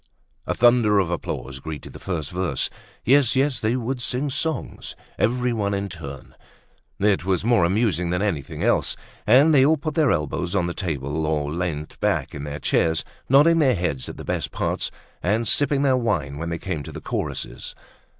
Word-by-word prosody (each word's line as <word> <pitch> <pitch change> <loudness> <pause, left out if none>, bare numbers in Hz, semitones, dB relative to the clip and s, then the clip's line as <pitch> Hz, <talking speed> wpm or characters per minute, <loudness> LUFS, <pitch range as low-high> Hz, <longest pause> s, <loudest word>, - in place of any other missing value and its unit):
A - - 0
thunder 120 -3 +5
of 95 -4 +2
applause 70 -5 -4
greeted 75 -1 -7
the - - -10
first 80 -6 -4
verse. 90 -6 -1 0.3
Yes, 135 0 +4
yes, 135 -1 +2
they 110 +3 +1
would 125 +1 -2
sing 130 +4 -2
songs! 155 +3 -3 0.2
Everyone 115 -4 +1
in 100 0 -3
turn. 70 -6 -9 0.6
It 100 -3 +2
was 95 +1 0
more 115 -7 +4
amusing 90 -3 +1
than 90 +3 0
anything 80 -10 -2
else. - - +2 0.3
And 135 +8 +6
they 135 -3 +6
all 155 +3 +4
put 155 +2 -4
their 155 -3 +3
elbows 85 - -1
on 90 -3 +2
the 85 - -2
table 75 -3 -2
or 75 -1 -1
leant 80 -3 -4
back - - 0
in 75 -1 -6
their 75 0 -5
chairs, 80 +1 +1 0.2
nodding 150 +5 +6
their 135 -5 +4
heads 85 -8 -2
at - - -8
the - - -8
best - - -2
parts - - -1 0.3
and 110 +5 +1
sipping 145 +3 +2
their 135 -2 +4
wine 85 - -1
when 85 +1 -3
they 85 - -2
came 85 -4 -4
to - - -8
the - - -7
choruses. - - -4
100 Hz, 185 wpm, -23 LUFS, 80-125 Hz, 0.6 s, And